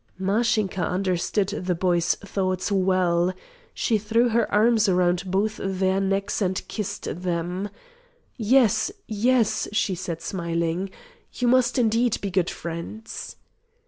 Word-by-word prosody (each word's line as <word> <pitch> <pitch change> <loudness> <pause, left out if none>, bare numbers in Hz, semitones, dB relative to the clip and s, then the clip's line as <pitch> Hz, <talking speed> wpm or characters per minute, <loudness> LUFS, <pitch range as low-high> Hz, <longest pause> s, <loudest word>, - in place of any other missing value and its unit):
Mashinka 200 -1 +1
understood 185 +2 0
the 185 -3 -2
boy's 175 -1 +2
thoughts 185 -1 -2
well. 185 -2 +2 0.4
She 220 -3 +1
threw 230 +4 +2
her 230 0 +1
arms 215 0 +4
round 180 0 +1
both 210 +3 0
their 190 0 +1
necks 195 +2 -1
and 185 -1 +1
kissed 205 -4 -4
them. 180 +2 -2 0.7
"Yes, 235 -1 +3
yes," 230 +1 +1
she 210 -2 +1
said 175 -2 -5
smiling, 170 +1 -2 0.5
"you 245 - 0
must 250 +1 +3
indeed 230 0 +2
be 200 - -4
good 180 -1 +1
friends." 170 +7 -7
195 Hz, 120 wpm, -24 LUFS, 180-215 Hz, 0.7 s, arms